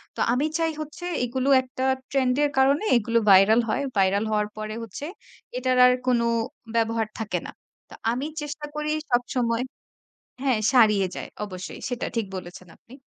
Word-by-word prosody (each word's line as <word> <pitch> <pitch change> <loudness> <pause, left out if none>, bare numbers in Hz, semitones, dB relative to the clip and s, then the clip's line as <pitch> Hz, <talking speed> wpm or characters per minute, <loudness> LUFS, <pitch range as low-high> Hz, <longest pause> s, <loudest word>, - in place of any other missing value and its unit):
তো - - -10
আমি 265 +4 +1
চাই 325 -1 +1
হচ্ছে 310 +4 -8 0.2
এগুলো 260 +3 -1
একটা 255 0 -6 0.3
ট্রেন্ড 260 -2 +2
এর 290 - +3
কারণে 275 +6 +4
এগুলো 230 +1 +1
ভাইরাল 195 +5 +7
হয়। 280 - 0
ভাইরাল 195 +2 +2
হওয়ার 210 -1 +1
পরে 215 0 -5
হচ্ছে 230 +6 -7 0.5
এটার 255 0 +1
আর 250 - +6
কোনো 240 -2 +3 0.5
ব্যবহার 225 -1 +1
থাকে 220 -2 -2
না। - - -7 0.4
তো - - -13 0.2
আমি 255 +4 -2 0.2
চেষ্টা 295 0 -5
করি 300 0 -2 0.2
সবসময় 245 -1 +1 0.8
হ্যাঁ 260 -5 +2
সারিয়ে 210 -6 +5
যায়। - - -6 0.2
অবশ্যই, 185 -3 -8
সেটা 245 -1 -3
ঠিক 225 -3 0
বলেছেন 180 0 -9
আপনি। 245 - -17
240 Hz, 160 wpm, -25 LUFS, 215-265 Hz, 0.8 s, ভাইরাল